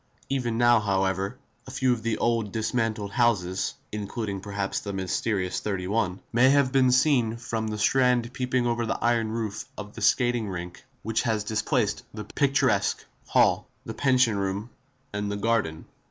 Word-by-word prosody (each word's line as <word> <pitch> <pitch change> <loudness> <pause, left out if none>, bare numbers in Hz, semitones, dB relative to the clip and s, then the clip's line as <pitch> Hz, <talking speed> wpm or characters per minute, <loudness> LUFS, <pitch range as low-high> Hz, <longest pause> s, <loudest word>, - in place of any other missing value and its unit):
Even 125 -4 -1
now, 120 -1 +5
however, 95 +1 0 0.3
a - - -8
few 130 -1 +1
of 115 - -4
the 115 -1 -1
old, 115 -3 0
dismantled 110 -2 -1
houses 95 -7 +1 0.2
(including 105 -1 -4
perhaps, 100 -1 -3
the 100 - -5
mysterious 95 0 -1
31) 100 -1 -1
may 130 +4 +5
be 130 -1 +3
seen 125 -3 +3
from 115 -2 -3
the 105 0 -3
Strand 125 +2 +2
peeping 125 -1 0
over 120 -1 0
the - - -1
iron 115 -2 +1
roof 110 -3 -3
of 105 0 -8
the - - -9
skating 120 -4 +2
rink 90 -1 -6 0.2
which 110 +1 0
has 110 -3 0
displaced 110 0 0
the 105 - -5
picturesque 135 +6 +1 0.2
hall, - - +3 0.2
the - - -5
pension 130 -5 +3
room 100 +4 -3 0.4
and 105 0 -2
the 100 - -2
garden. 100 -7 0
110 Hz, 155 wpm, -26 LUFS, 100-120 Hz, 0.4 s, now